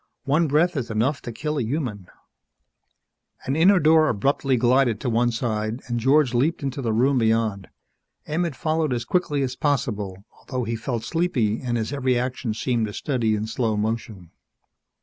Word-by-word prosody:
One 155 +4 +2
breath 165 +5 +2
is 125 -4 -3
enough 115 +7 0
to 120 - -6
kill 150 +6 -3
a - - 0
human 115 - -3 0.7
" - - -30
An 135 - -1
inner 185 +5 +5
door 155 0 +5
abruptly 135 +4 +1
glided 120 -2 +3
to 125 - -1
one 120 +1 +2
side 115 -1 -2
and 120 -1 -2
George 135 +1 +3
leaped 140 +6 +1
into 135 0 -3
the 115 -3 -1
room 130 +4 +2
beyond. 110 -5 0 0.6
Emmett 160 -1 -2
followed 155 -1 0
as 120 -1 -3
quickly 150 -6 0
as 130 -1 -3
possible, 105 -9 -2
although 130 -2 -4
he 115 0 -2
felt 115 0 -3
sleepy 130 -11 0
and 120 -2 -1
his 110 +4 -3
every 130 -3 +1
action 125 -2 -2
seemed 115 -1 0
a 105 - -7
study 115 -5 0
in 105 +1 -2
slow 110 -1 -1
motion. 105 -5 -3
125 Hz, 175 wpm, -23 LUFS, 110-145 Hz, 0.7 s, inner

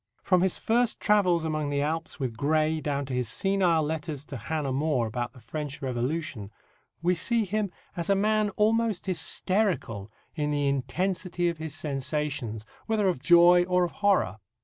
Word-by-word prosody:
From 185 -2 +3
his 190 -1 +1
first 235 +1 +1
travels 185 -6 +3
among 155 -2 -1
the 140 0 0
Alps 160 +1 -3
with 125 -4 -3
Gray 155 +4 +1
down 140 -1 -2
to 130 - -6
his 125 -3 -1
senile 180 +2 +2
letters 150 -2 -4
to 135 - -7
Hannah 140 +3 -2
More 140 -3 +1
about 120 +2 -4
the 130 - -14
French 140 +5 -6
Revolution, 130 -3 -3 0.5
we 180 +1 +3
see 225 +6 +1
him 205 +1 -1 0.3
as 170 +1 -3
a 200 - +5
man 215 +1 +2
almost 220 -2 +1
hysterical 180 - 0 0.2
in 150 -2 -2
the 145 -1 0
intensity 180 +6 -1
of 170 -2 -5
his 160 -2 -4
sensations, 140 -6 -3 0.2
whether 215 -3 +1
of 175 - -1
joy 175 +2 +6
or 180 0 +2
of 175 - -1
horror. 200 - +1
160 Hz, 170 wpm, -27 LUFS, 140-185 Hz, 0.5 s, joy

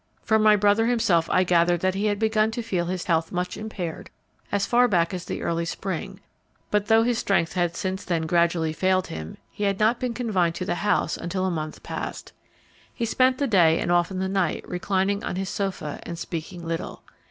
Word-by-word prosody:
From 220 -1 +3
my 215 0 +6
brother 205 +2 +3
himself 180 -9 +2
I 185 - +3
gathered 175 -1 +3
that 185 0 +1
he 200 +3 0
had 205 -1 0
begun 220 0 +2
to 235 - -3
feel 180 -6 -1
his 180 0 -2
health 165 -2 0
much 180 0 -2
impaired 195 -6 -6 0.4
as 200 -1 +1
far 245 +1 +4
back 175 -5 +1
as 180 -2 -5
the - - -4
early 170 0 0
spring, 190 +3 -4 0.5
but 210 0 +1
though 225 +1 +5
his 240 -1 +1
strength 190 -4 +1
had 175 -2 0
since 190 +2 -3
then 170 -3 -1
gradually 170 -1 +1
failed 185 +2 +1
him, 80 0 -7
he 205 - -3
had 195 -1 0
not 220 +3 +3
been 245 -2 -2
confined 185 -9 0
to 180 - -3
the - - 0
house 210 - +1
until 185 +2 -2
a 190 - 0
month 155 -2 -5
past. - - -6 0.6
He 235 - -3
spent 255 +3 +3
the 280 - 0
day 175 -9 +4
and 175 - -1
often 175 +2 +2
the 190 0 -1
night 190 -4 -1
reclining 195 +2 -1
on - - -3
his 190 +1 -3
sofa 185 -7 -3
and 170 - -7
speaking 170 +1 -6
little. 165 0 -4
185 Hz, 210 wpm, -25 LUFS, 170-210 Hz, 0.6 s, my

